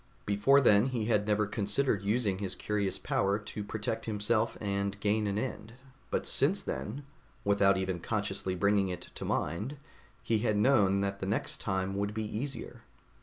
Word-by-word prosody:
Before 105 +8 +4
then, 105 -2 +5
he 120 -5 -2
had 105 -2 +1
never 105 0 +2
considered 105 +2 +1
using 100 -1 0
his 95 -2 -3
curious 105 -2 -1
power 100 +1 0
to 105 0 -6
protect 110 +2 -4
himself 110 +1 0
and 100 -1 -2
gain 105 +1 +1
an 100 0 -1
end; 115 -1 -4 0.4
but - - -1
since - - +3
then, 135 +7 -5 0.4
without 100 -1 +4
even 95 -2 -2
consciously 100 -2 -2
bringing 100 +1 +2
it 90 -2 -7
to - - -6
mind, 105 - -2 0.5
he 110 -2 +1
had 110 -2 +1
known 105 -4 +4
that 100 0 -2
the 95 - -3
next 100 - -1
time 95 -1 -1
would 100 +1 -2
be 110 - -1
easier. 125 +7 -5
105 Hz, 170 wpm, -31 LUFS, 100-110 Hz, 0.5 s, then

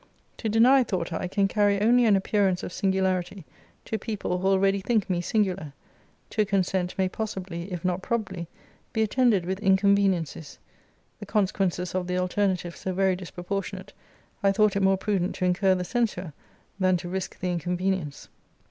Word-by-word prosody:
To 225 - -2
deny, 250 +5 +5
thought 180 -6 -3
I, 180 - -2
can 195 +2 +1
carry 205 0 +2
only 240 +3 +4
an 210 -3 +5
appearance 195 -1 +1
of - - -6
singularity 190 -2 -1 0.4
to 220 - -3
people 195 -4 -3
who 190 - 0
already 195 0 +3
think 220 0 +1
me 175 -1 0
singular. 185 -6 -1 0.6
To 215 - +2
consent 190 -3 -1
may 190 -1 +2
possibly, 190 -3 -5
if 180 0 -5
not 180 0 0
probably, 190 -7 -3 0.5
be 220 - +2
attended 220 -4 +2
with 190 +2 -2
inconveniencies. 190 -6 +1 0.6
The - - -9
consequences 190 -4 0
of 185 -1 -2
the 180 0 -1
alternative 180 -1 0
so 190 - -4
very 190 0 +2
disproportionate, 180 +2 -5 0.5
I 200 -1 +4
thought 215 0 +3
it 200 - +1
more 195 0 +4
prudent 190 -2 -1
to 185 - -1
incur 185 +1 +3
the 180 - -2
censure, 190 - -2 0.5
than 185 -1 +3
to 175 - -7
risque 190 +1 -4
the 180 0 -1
inconvenience.' 180 -2 -2
190 Hz, 165 wpm, -26 LUFS, 180-205 Hz, 0.6 s, deny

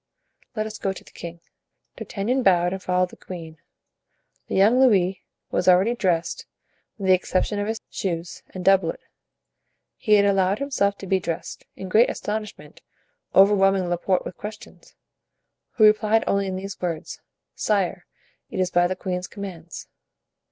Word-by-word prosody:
"Let 215 -1 -1
us 215 0 -7
go 195 - -1
to - - -11
the - - -18
king." 170 0 -9 0.5
D'Artagnan 235 +6 -2
bowed 180 -4 +3
and 190 - -5
followed 180 0 0
the - - -12
queen. 165 -4 -9 0.9
The - - -3
young 215 +6 +5
Louis 195 -8 +3 0.3
was - - 0
already 185 +6 +5
dressed, 180 -7 -1 0.5
with 200 - -5
the - - +8
exception 185 +3 0
of 205 - -2
his 225 0 -2
shoes 175 -2 -4
and 185 -1 -8
doublet; 190 -4 +3 1.0
he 215 - +1
had 200 -1 +5
allowed 195 0 +2
himself 200 -8 0
to - - -8
be 190 0 +1
dressed, 170 -2 -5
in 190 - -7
great 220 +6 +4
astonishment, 210 0 -6 0.5
overwhelming 195 -2 +5
Laporte 175 +2 0
with - - -7
questions, 210 +1 -10 0.8
who 220 - +2
replied 215 +1 +5
only 200 0 +1
in 190 - -3
these 195 +1 -7
words, 170 -3 -4 0.3
"Sire, 195 -4 -1 0.4
it - - -5
is 185 -1 +1
by 175 0 +3
the 185 - -2
queen's 180 -1 -4
commands." 180 -5 -8
190 Hz, 155 wpm, -24 LUFS, 180-205 Hz, 1.0 s, the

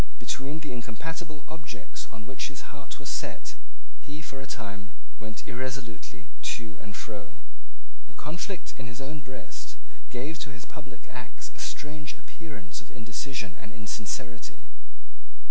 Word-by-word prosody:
Between 145 +4 +3
the 145 - +2
incompatible 145 +6 0
objects 150 -7 -1
on 110 -2 -4
which 130 +2 +3
his 135 +1 -3
heart 145 -1 -2
was - - -5
set - - +3 0.5
he, 145 0 -2
for 140 -3 -1
a 135 - -2
time, 100 -4 0 0.3
went 110 0 -1
irresolutely 120 -6 +1 0.3
to 110 -3 -3
and 105 -2 -2
fro. - - -1 0.7
The - - -15
conflict 180 +5 +2
in 125 - +1
his 120 - -2
own 145 +2 +1
breast 130 0 -3 0.3
gave 145 +6 +2
to 145 - +2
his 120 -4 -4
public 135 -5 -6
acts - - -2
a - - -9
strange 150 0 +2
appearance 150 - -3
of 100 - -11
indecision 115 -3 +2
and 100 - -3
insincerity. 110 +2 +1
130 Hz, 145 wpm, -36 LUFS, 110-150 Hz, 0.7 s, Between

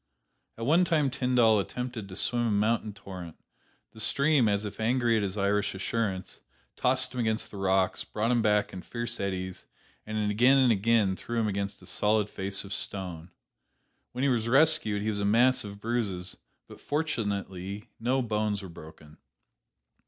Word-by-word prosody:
At 115 - -4
one 165 +7 +5
time 155 -6 +2
Tyndall 125 -4 +3
attempted 115 +2 -4
to 95 - -8
swim 120 +3 0
a - - +1
mountain 110 +1 +1
torrent; 90 -5 -9 0.6
the 110 - -14
stream, 140 +2 +3
as 100 +1 0
if 105 - -7
angry 120 +1 +2
at 110 - +2
his 100 0 -3
Irish 100 0 +1
assurance, 95 -1 -3 0.4
tossed 130 +1 +1
him 125 - -4
against 110 -1 -1
the 100 - -8
rocks, 95 -1 +1
brought 110 +3 -1
him 120 -1 +3
back 105 -1 +2
in 95 - -6
fierce 120 +3 -5
eddies, 95 -2 -4 0.4
and 110 -1 -1
again 125 +6 +5
and 130 -3 +5
again 105 -2 +2
threw 120 +4 -3
him 110 - +1
against 100 0 -3
a - - -12
solid 105 0 +1
face 95 0 -3
of 100 0 -7
stone. 90 -4 -5 0.8
When 125 +2 -3
he 140 - +3
was 115 -2 0
rescued 135 -7 +4
he 110 - 0
was 105 -1 -2
a - - -1
mass 120 +5 +4
of 100 -1 -8
bruises, 105 -6 -2 0.3
but - - -13
fortunately 100 - -3
no 125 +3 +1
bones 105 -2 -1
were 95 - -8
broken. 80 -2 -13
105 Hz, 175 wpm, -28 LUFS, 100-120 Hz, 0.8 s, one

